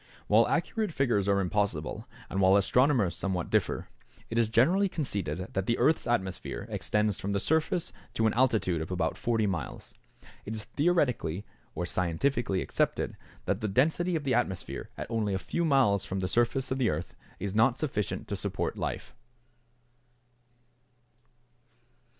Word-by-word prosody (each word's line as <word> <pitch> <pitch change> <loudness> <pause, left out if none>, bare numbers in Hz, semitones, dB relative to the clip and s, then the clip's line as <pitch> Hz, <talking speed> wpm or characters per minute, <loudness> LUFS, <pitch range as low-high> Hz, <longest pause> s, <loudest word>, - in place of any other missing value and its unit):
= - - -27
While - - +5
accurate 220 -5 0
figures 120 -9 +1
are 100 0 +3
impossible, 95 -5 -1 0.2
and 95 - -1
while 95 +1 +6
astronomers 120 -1 +3
somewhat 90 -3 -2
differ, - - +1 0.4
it 115 - +1
is 115 -2 +2
generally 175 - +4
conceded 95 - -3
that 95 0 -1
the 120 - +2
earth's 155 -5 +2
atmosphere 95 -6 -2
extends 105 -2 0
from 100 +1 -2
the 100 - +1
surface 160 - 0 0.2
to 115 - +2
an 110 - +3
altitude 110 -9 +2
of 80 - -5
about 90 -3 -1
40 115 -2 0
miles. 85 -8 -4 0.5
It 110 - -5
is 110 - -5
theoretically 125 - 0 0.3
or 90 - -2
scientifically 95 +5 0
accepted - - -1 0.3
that 100 +2 -1
the 110 - 0
density 160 - +2
of 155 - -1
the 135 -2 +1
atmosphere 95 -8 -2
at - - -4
only 105 -4 0
a - - +1
few 170 - -2
miles 135 - +3
from 95 - -3
the 90 - -1
surface 120 +5 +1
of 130 - 0
the 125 - +3
earth 75 +3 -3 0.3
is 100 -1 -3
not 115 +3 +4
sufficient 110 - -2
to - - -1
support - - -3
life. - - -4
105 Hz, 160 wpm, -29 LUFS, 95-130 Hz, 0.5 s, while